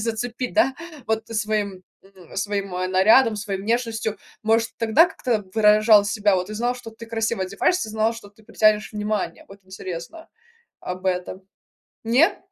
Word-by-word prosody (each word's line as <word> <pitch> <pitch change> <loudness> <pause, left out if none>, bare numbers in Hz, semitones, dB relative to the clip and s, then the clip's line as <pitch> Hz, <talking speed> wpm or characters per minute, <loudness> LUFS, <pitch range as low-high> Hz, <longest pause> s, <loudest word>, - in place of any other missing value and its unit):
зацепить, 235 +3 -3
да, 295 -5 +3 0.3
вот 220 0 -1
своим, 210 -4 -2 0.2
м 190 -3 -16
своим 200 -1 -2
нарядом, 190 +6 +4
своей 200 -2 -4
внешностью, 225 0 -1 0.3
может 225 +1 +2
тогда 230 +10 +5
как-то 235 - -2
выражал 215 -1 +6
себя? 205 -1 +1
Вот 180 0 -2
ты 215 - -7
знал, 240 +3 -1
что 240 -2 -10
ты 225 +1 -12
красиво 225 -2 -1
одеваешься, 215 - 0
знал, 220 +1 +1
что 230 -3 -11
ты 210 +1 -23
притянешь 215 0 +2
внимание? 210 0 -3
Вот 195 +1 -13
интересно 190 - -8 0.5
об 185 +1 -6
этом. 185 +1 -2 0.6
Нет? 260 - +3
215 Hz, 150 wpm, -23 LUFS, 195-230 Hz, 0.6 s, выражал